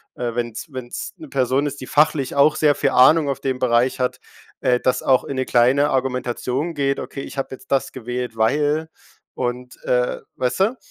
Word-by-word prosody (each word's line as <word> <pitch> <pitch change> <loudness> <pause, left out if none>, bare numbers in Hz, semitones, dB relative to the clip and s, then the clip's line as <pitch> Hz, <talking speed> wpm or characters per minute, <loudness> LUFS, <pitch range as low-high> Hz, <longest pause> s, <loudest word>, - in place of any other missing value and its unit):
äh, 120 -1 -3
wenn's 120 +4 -4
wenn's 130 -2 -6
'ne 155 - -11
Person 135 +1 +1
ist, 145 0 -6
die 130 - -8
fachlich 150 -3 +2
auch 145 +2 +5
sehr 150 -2 +4
viel - - +1
Ahnung 145 +3 +5
auf 140 -1 -2
den 130 -2 -2
Bereich 125 +1 +2
hat, 125 - -1 0.4
äh, 125 -1 +2
das 130 0 +1
auch 130 -1 +3
in 140 - -5
'ne 130 - 0
kleine 130 +5 +3
Argumentation 130 +3 -1
geht: 140 -2 0
„Okay, 135 - -6
ich - - -9
habe 135 - -2
jetzt - - -20
das 135 -1 +1
gewählt, 125 -1 -5
weil“ 145 +7 +1 0.5
und, 125 0 -4
äh, 125 0 +1 0.2
weißt 125 +6 -1
du, 225 +7 +2
130 Hz, 195 wpm, -21 LUFS, 125-140 Hz, 0.5 s, auch